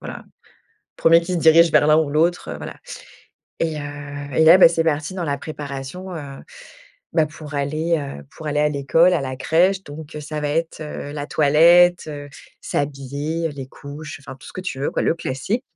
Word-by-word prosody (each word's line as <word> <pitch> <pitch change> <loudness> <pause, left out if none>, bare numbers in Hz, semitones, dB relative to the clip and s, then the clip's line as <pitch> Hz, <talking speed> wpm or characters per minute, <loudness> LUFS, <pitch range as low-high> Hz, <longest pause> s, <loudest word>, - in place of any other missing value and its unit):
voilà. - - -8 0.7
Premier 165 +1 +5
qui 175 +2 -4
se 175 - 0
dirige 165 +1 +6
vers 145 - +4
l'un 155 0 +6
ou 155 -3 +1
l'autre, 165 +4 0
heu, - - -7
voilà. - - -8 0.9
Et, 160 -2 -1
heu, - - -6 0.5
et 160 - +4
là, 165 +3 +8
bah, 180 - +9
c'est 165 -1 0
parti 155 +3 -1
dans 180 -3 -3
la 140 -2 -2
préparation, 150 +5 -7
heu, - - -5 0.9
bah, 160 -2 +3
pour 150 -1 -11
aller, 155 +4 0
heu, 140 - -7
pour 155 - -9
aller 150 0 0
à 150 - +3
l'école 150 +5 +3
à 170 - +1
la 130 -1 -4
crèche 185 +6 +2
donc, 150 +1 -10
heu - - -5
ça 150 +1 -5
va 145 - -1
être, 165 +1 -2
heu, 150 -1 -6
la 145 -1 -5
toilette, 170 +5 +5
heu, 145 -1 -7 0.3
s'habiller, 145 +4 -3
heu, - - -6
les 135 -3 -7
couches, 145 +2 -9
enfin 135 -2 -10
tout - - -15
ce - - -12
que 185 - -5
tu 180 -8 -5
veux 145 - -1
quoi, - - -1
le - - +2
classique. 170 - -3
155 Hz, 210 wpm, -21 LUFS, 145-165 Hz, 0.9 s, bah